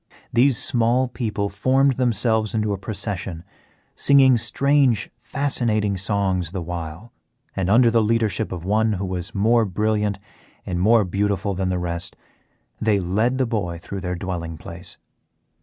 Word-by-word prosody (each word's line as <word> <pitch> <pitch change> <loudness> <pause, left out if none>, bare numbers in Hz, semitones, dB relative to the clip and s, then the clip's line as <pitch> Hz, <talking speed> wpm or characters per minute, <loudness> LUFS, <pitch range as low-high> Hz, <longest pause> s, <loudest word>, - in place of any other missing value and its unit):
These 125 +1 +4
small 120 +2 +2
people 110 -4 -3
formed 130 +6 +2
themselves 110 -3 +1
into 105 -2 0
a - - -2
procession, 95 -5 -5 0.5
singing 135 -2 +5
strange 135 -1 +2
fascinating 120 -6 -1
songs 95 -3 0
the 95 - -3
while, 85 +4 -7 0.4
and 95 -1 -1
under 115 +3 +5
the 115 0 +3
leadership 110 -1 0
of 90 -2 -6
one 110 +2 +2
who 100 0 -3
was 90 -1 -5
more 115 +4 +3
brilliant 105 0 0 0.5
and 90 -1 -3
more 110 +4 +4
beautiful 100 +1 -1
than 95 0 -2
the 90 - -1
rest 85 0 -3 0.7
they 105 -2 +2
led 105 +8 0
the 130 - +1
boy 100 -8 -2
through 95 +3 -7
their 90 -1 -3
dwelling 85 -3 -5
place. 85 +2 -10
105 Hz, 145 wpm, -22 LUFS, 95-115 Hz, 0.7 s, singing